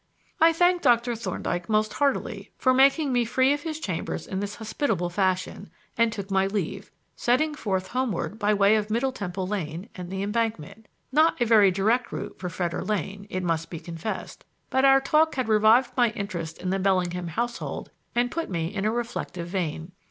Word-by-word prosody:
I 325 +1 +7
thanked 355 +2 +2
Dr. 240 -2 +3
Thorndyke 180 -4 -3
most 215 0 +1
heartily 245 -7 -1
for 255 - +3
making 275 +2 +4
me 245 -1 +3
free 260 +4 +3
of 290 - -3
his 315 0 -4
chambers 170 - -4
in 190 - -4
this 205 +1 -4
hospitable 215 - -2
fashion 185 +1 -1 0.3
and 230 0 +3
took 200 -2 -6
my 190 0 +3
leave, 195 0 -3 0.3
setting 300 +6 +1
forth 190 -9 -2
homeward 230 -4 -2
by 210 -1 +2
way 205 +1 +4
of 210 0 -2
Middle 240 +5 +1
Temple 190 -6 -4
Lane 185 0 -4
and 180 -2 -7
the 190 +1 -3
Embankment; 220 -2 -3 0.2
not 310 +3 +3
a 240 - +3
very 215 -3 +6
direct 220 +7 +1
route - - -6
for 180 - -4
Fetter 175 0 -2
Lane, 200 0 -3
it 185 0 -3
must 165 -2 -1
be 165 - -6
confessed; 170 +6 -6 0.3
but 265 - +2
our 270 0 +7
talk 310 +3 +3
had 255 -3 -1
revived 220 +3 +5
my 245 -3 +4
interest 175 -7 -5
in 185 - -2
the 195 - 0
Bellingham 180 -2 0
household 235 +9 -4 0.2
and 245 +1 +1
put 330 0 -3
me 170 0 -2
in 200 -1 -2
a 215 - +2
reflective 230 -7 -4
vein. 170 -2 -3
210 Hz, 190 wpm, -26 LUFS, 185-245 Hz, 0.3 s, I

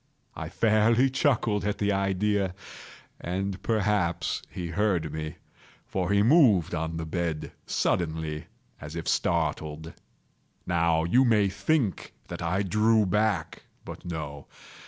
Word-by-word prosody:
I - - -5
fairly 115 +4 +3
chuckled 120 -6 +1
at 105 0 -1
the 105 0 +1
idea; 100 0 0 0.6
and 95 +2 -3
perhaps 105 -6 0
he 85 -2 -5
heard 85 -4 0
me; 80 -1 -5 0.5
for 90 -2 -2
he 100 0 +4
moved 115 - +5
on 80 -1 -2
the 80 - -4
bed 80 -2 -3 0.2
suddenly, 80 -3 -1 0.3
as 75 +2 -8
if 85 - -5
startled. 80 -1 -1 0.7
Now 85 -2 +2
you 120 +11 +4
may 105 -5 +3
think 105 - -1
that - - -6
I 90 +4 0
drew 105 +3 +3
back—but 100 -3 -2
no. 75 -5 -6
95 Hz, 120 wpm, -27 LUFS, 80-105 Hz, 0.7 s, moved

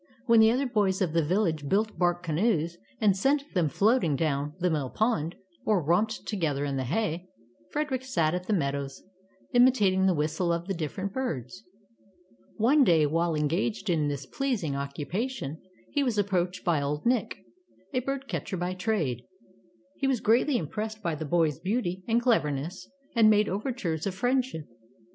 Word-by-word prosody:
When 230 -2 +5
the 220 0 +7
other 255 +4 +1
boys 205 -6 +1
of 180 -5 0
the 165 - +3
village 160 -4 0
built 215 +3 +1
bark 175 0 +1
canoes, 170 0 0 0.2
and 205 -3 +4
sent 280 +8 0
them 170 -5 +2
floating 200 - +2
down 145 0 -1
the 180 -1 +1
mill 145 -5 -1
pond, 180 - 0 0.3
or 215 -3 +2
romped 205 +8 +1
together 155 -9 -1
in 140 -1 -2
the 130 -1 -2
hay, 175 - -1 0.4
Frederick 290 -4 -2
sat 170 -11 +1
in 180 - -1
the 215 - +1
meadows, 140 -5 -2 0.5
imitating 210 -7 +4
the 185 - +3
whistle 155 +4 0
of 170 0 -1
the 195 - -1
different 185 +4 -4
birds. 185 - -4 0.9
One 270 +7 +4
day, 165 - +4
while 165 +2 +1
engaged 170 +7 0
in 155 -3 +1
this 140 -2 -3
pleasing 200 - -2
occupation, 150 - -4 0.3
he 290 - +1
was 245 -5 0
approached 185 -3 0
by 165 -4 +2
old 145 +1 -3
Nick, 245 +1 +1 0.6
a 255 - +2
bird 275 +1 -4
catcher 180 - -3
by 180 +1 -2
trade. 185 - -1 0.8
He 270 - +1
was 260 -3 +1
greatly 245 +6 +3
impressed 215 +6 -4
by 170 - 0
the 155 +1 -4
boy's 155 -2 +1
beauty 190 -3 -2
and 230 0 +3
cleverness, 180 - 0 0.3
and 225 -2 +6
made 210 -1 +4
overtures 200 - -2
of 190 - -3
friend 250 +6 +2
ship. 160 - -8
185 Hz, 170 wpm, -28 LUFS, 155-225 Hz, 0.9 s, the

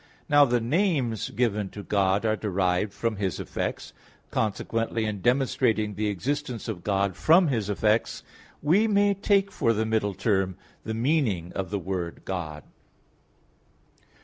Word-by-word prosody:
Now 145 -1 +6
the 120 -2 +1
names 130 - 0
given 105 -3 0
to 100 - -9
God 100 +1 +1
are 110 -1 +2
derived 95 -1 0
from 110 +1 -2
His 95 -5 -2
effects; - - -4 0.4
consequently, 115 +1 -1
in 105 -2 -3
demonstrating 125 -4 +1
the 105 +2 -1
existence 125 +5 -3
of 95 -7 -5
God 100 -2 0
from 170 +1 +4
His 110 -6 -1
effects, 105 +2 +1 0.4
we 190 +9 +4
may 205 -1 +3
take 200 0 +1
for 115 - +1
the 110 0 0
middle 110 -3 0
term 95 -2 0 0.3
the 110 - -4
meaning 115 - 0
of 95 -1 -3
the 100 - -1
word 90 -2 -4
"God". 80 -5 -4
110 Hz, 145 wpm, -26 LUFS, 100-130 Hz, 0.4 s, Now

